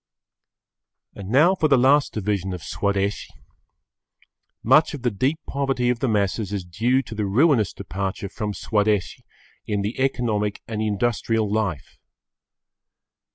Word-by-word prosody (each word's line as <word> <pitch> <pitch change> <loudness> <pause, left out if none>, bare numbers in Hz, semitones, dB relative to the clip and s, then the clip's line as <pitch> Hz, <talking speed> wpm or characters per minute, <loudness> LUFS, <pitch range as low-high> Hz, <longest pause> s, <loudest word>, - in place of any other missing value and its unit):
And 100 -1 -9
now 150 - +5
for 170 -5 +1
the 140 -3 +4
last 135 +3 +4
division 100 -3 -2
of 85 - -9
Swadeshi, 100 0 -1 1.4
much 150 +6 +4
of 135 - -10
the 120 - +1
deep 130 +10 0
poverty 135 -3 -1
of 120 - -3
the 135 - 0
masses 105 -1 0
is 100 -3 -3
due 120 +10 0
to - - -9
the 105 -2 -2
ruinous 120 - +3
departure 95 +1 -4
from 105 +1 -4
Swadeshi 105 -1 -1 0.4
in 100 -1 -1
the 105 +5 -4
economic 115 -6 -1
and 110 -1 -3
industrial 110 +1 0
life. 95 -9 -3
110 Hz, 135 wpm, -23 LUFS, 100-130 Hz, 1.4 s, now